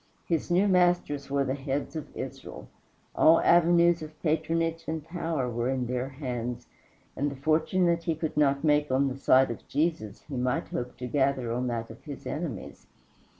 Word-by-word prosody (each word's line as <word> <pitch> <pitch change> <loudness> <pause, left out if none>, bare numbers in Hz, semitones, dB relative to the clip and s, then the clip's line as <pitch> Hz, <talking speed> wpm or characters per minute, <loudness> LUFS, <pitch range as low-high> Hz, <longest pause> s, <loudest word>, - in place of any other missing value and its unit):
His 165 -3 -1
new 180 +4 +3
masters 175 -7 +2
were 140 0 +1
the 130 - -1
heads 140 +2 -3
of 155 - -5
Israel: - - -7 0.5
all 160 +1 +6
avenues 170 0 +4
of 155 0 -9
patronage 165 +1 0
and 160 -1 -3
power 165 -6 -2
were 120 +1 -1
in 130 -2 -1
their 125 +2 -2
hands, 125 -3 -5 0.5
and 145 +2 0
the 140 - -7
fortune 160 +6 +1
that 170 -1 +1
he 165 - 0
could 160 0 -4
not 140 -1 +2
make 150 -1 +3
on 135 +1 +2
the 130 - -6
side 130 -2 +4
of 115 - -9
Jesus 145 - -1
he 140 -3 -6
might 125 0 -1
hope 125 0 -5
to 125 - -5
gather 135 -2 0
on 125 +1 -1
that 115 -1 -3
of 115 - -14
his 145 -3 -9
enemies. 150 - -5
145 Hz, 185 wpm, -28 LUFS, 130-165 Hz, 0.5 s, all